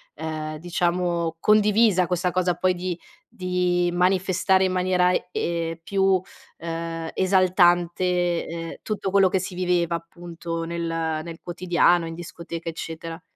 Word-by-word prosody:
ehm, 155 0 -5
diciamo, 170 0 -1
condivisa 210 -2 +4
questa 180 0 0
cosa 180 -1 +1
poi 185 +1 +2
di 180 -1 -4 0.3
di 180 -3 0
manifestare 185 +1 +2
in 185 - +1
maniera, 180 0 +2 0.2
uhm, 165 -1 -2
più, 195 0 +2 0.4
ehm, 165 0 -4
esaltante, 180 -2 +2
uhm, 165 0 -5
tutto 205 -3 -3
quello 195 -1 +5
che 190 - +1
si 185 0 -5
viveva, 175 -2 +1
appunto, 170 0 -6
nel 170 +1 -4
nel 165 0 -3
quotidiano, 175 -1 +2
in 165 - -6
discoteca, 170 -1 -7
eccetera. 165 +1 -7
175 Hz, 125 wpm, -24 LUFS, 165-185 Hz, 0.4 s, quello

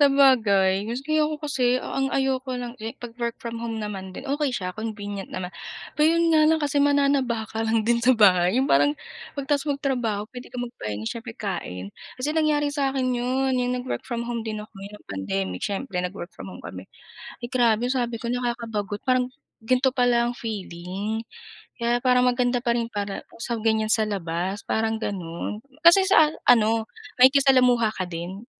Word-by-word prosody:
Sabagay 220 -9 +4
kasi 305 +5 0
ako 305 0 0
kasi 255 -3 +2
ang 270 +1 -2
ayoko 265 -1 0
lang 245 0 -5
kasi 225 -2 -6
'pag 240 -1 -9
work 235 -1 -1
from 230 0 -6
home 225 -1 -3
naman 195 -3 -5
din 265 +9 -9
okey 285 0 0
siya, 185 -7 -3
convenient 205 -3 -5
naman. 185 0 -5 0.4
Pero 315 +2 +4
'yon 335 - +3
nga 310 - +6
lang 320 - +3
kasi 290 -1 +1
mananaba 275 -6 +2
ka 225 0 -3
lang 225 -1 +1
din 235 0 +2
sa 255 - +5
bahay. 190 -2 +5
Yung 265 - +2
parang 145 - +3 0.4
'pag 275 - -3
tapos 285 -1 +1
magtrabaho 245 -7 -1
puwede 245 +1 -10
kang 245 -1 -4
magpahinga 110 - -6
siyempre, 230 - -6
kain. 100 - -5 0.2
Kasi 290 +4 -1
nangyari 305 -2 +2
sa 275 -2 +1
akin 255 -2 0
'yon, 260 +2 0
'yong 250 0 0
nag-work 250 +1 -4
from 235 -1 -4
home 235 -2 -3
din 215 -1 -4
ako 210 0 -10
no'ng 200 +2 -11
pandemic 95 -1 -3
siyempre, 195 -2 -2
nag-work 180 0 -6
from - - -9
home - - -11
kami. - - -7 0.6
Ay 240 - -5
grabe, 240 -1 +2
sabi 240 -3 -1
ko 235 +1 -4
nakakabagot. 230 -4 -3
Parang 255 -1 +2 0.3
gan'to 255 +3 +2
pala 245 -2 +2
ang - - -7
feeling 205 +1 -4 0.5
kaya 235 +1 +2
parang 250 -1 +4
maganda 245 0 +2
pa 235 -1 +1
rin 235 - 0
para 200 -1 -4 0.2
sa 235 +1 -3
ganyan 220 -1 +2
sa 220 0 +3
labas 190 0 -3
parang 220 0 0
gano'n. 175 0 -4 0.2
Kasi 345 +3 +7
sa 320 -6 +6
a 300 - +4
ano, 225 -1 +2 0.3
makikisalamuha 255 -3 +5
ka 185 - -1
din 180 +5 -6
235 Hz, 180 wpm, -25 LUFS, 205-260 Hz, 0.6 s, Kasi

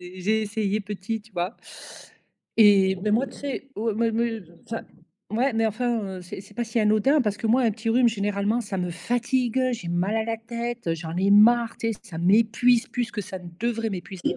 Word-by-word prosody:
j'ai 185 +5 -1
essayé 210 -1 -1
petit, 210 +2 -4
tu 215 +1 -22
vois? 180 +4 -3 1.0
Et 195 -3 +6
mais 210 - 0
moi, 235 +6 +2
tu - - -12
sais, 275 -1 -5
oh, 225 +1 0
mais 230 +1 +1
me 225 -1 -1 0.2
enfin, 230 -1 -5 0.5
ouais, 250 +5 +1
mais, 225 0 +2
enfin, 235 +1 -1 0.2
heu, - - -10
c'est 180 +2 -8
c'est 205 - -16
pas 240 - -2
si 230 +1 -2
anodin, 215 +8 +3
parce 210 -3 -1
que, - - -2
moi, 235 +4 +4
un 230 - +3
petit 220 +2 -5
rhume, 245 +1 +4
généralement, 205 +1 0
ça 200 -3 -4
me 180 -1 -2
fatigue, 245 +6 -1
heu, 255 -1 +2
j'ai 185 -7 -7
mal 180 +5 0
à 220 - 0
la 225 0 -2
tête, 235 +1 -5
heu, 165 - +2
j'en 160 0 -6
ai 195 +2 +2
marre, 230 +3 +5
tu 225 0 -1
sais, 210 - -10
ça 195 -8 -10
m'épuise 230 +6 +3
plus 240 -1 -2
que 215 - -4
ça 190 0 -7
ne 180 -1 -10
devrait 230 -1 -1
m'épuiser, 190 -1 -4
220 Hz, 220 wpm, -25 LUFS, 200-235 Hz, 1.0 s, Et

